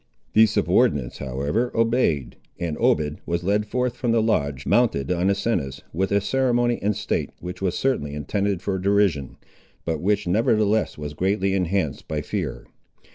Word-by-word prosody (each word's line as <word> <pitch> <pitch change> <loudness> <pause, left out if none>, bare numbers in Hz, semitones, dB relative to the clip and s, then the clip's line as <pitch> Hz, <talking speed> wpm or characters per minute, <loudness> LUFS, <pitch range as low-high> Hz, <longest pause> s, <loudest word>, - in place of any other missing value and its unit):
The 110 +1 +7
subordinates, 70 - +1
however, 70 - -1
obeyed, 100 - +1 0.2
and 85 -3 -2
Obed 75 0 +2
was 85 0 -1
led 105 +3 +1
forth 125 +2 -1
from 120 -3 -1
the 115 - +3
lodge, 70 - 0
mounted 105 - +2
on 90 +2 +1
Asinus, 90 - -1
with 95 +4 -1
a 100 - +4
ceremony 120 +1 +1
and 105 +1 +1
state - - -2
which 90 +2 -7
was 95 -3 0
certainly 75 - -1
intended 100 +6 -1
for 95 -1 -1
derision, 95 -7 +1 0.5
but 80 -2 -2
which 105 +2 +1
nevertheless 110 +2 +2
was 75 -1 -6
greatly 95 +4 0
enhanced 95 -5 -1
by - - -2
fear. - - -4
95 Hz, 155 wpm, -23 LUFS, 75-110 Hz, 0.5 s, The